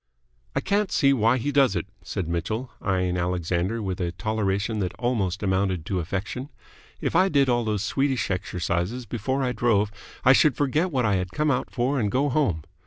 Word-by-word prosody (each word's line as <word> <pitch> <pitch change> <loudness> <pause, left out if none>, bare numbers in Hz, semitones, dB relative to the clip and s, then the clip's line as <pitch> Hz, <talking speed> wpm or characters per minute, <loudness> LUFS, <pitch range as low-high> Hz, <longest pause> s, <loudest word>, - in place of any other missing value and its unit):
"I - - +1
can't 205 0 0
see 140 -1 +4
why 115 0 +3
he 140 +4 -1
does 140 -3 +4
it," - - -1 0.2
said 90 -5 -3
Mitchell, 110 +9 -3
eyeing 90 -2 0
Alexander 90 +4 -1
with 95 -2 -3
a 85 -1 -1
toleration 105 +2 -1
that 90 -3 -2
almost 105 -7 -1
amounted 95 -3 0
to 95 -1 -1
affection. 100 - -4 0.5
"If - - -1
I 185 +3 +5
did 140 -4 +3
all 120 -1 +2
those 105 -2 -1
Swedish 135 0 0
exercises 90 +5 -2
before 130 +4 -2
I 125 - +1
drove, 105 -3 +2 0.3
I 130 - +8
should 140 -1 +4
forget 150 +5 +1
what 130 -7 0
I 100 -2 +2
had 90 0 -3
come 150 +4 +1
out 125 - -1
for 130 +3 0
and 105 -3 +1
go 140 +3 +2
home." 125 - +1
110 Hz, 190 wpm, -25 LUFS, 95-130 Hz, 0.5 s, I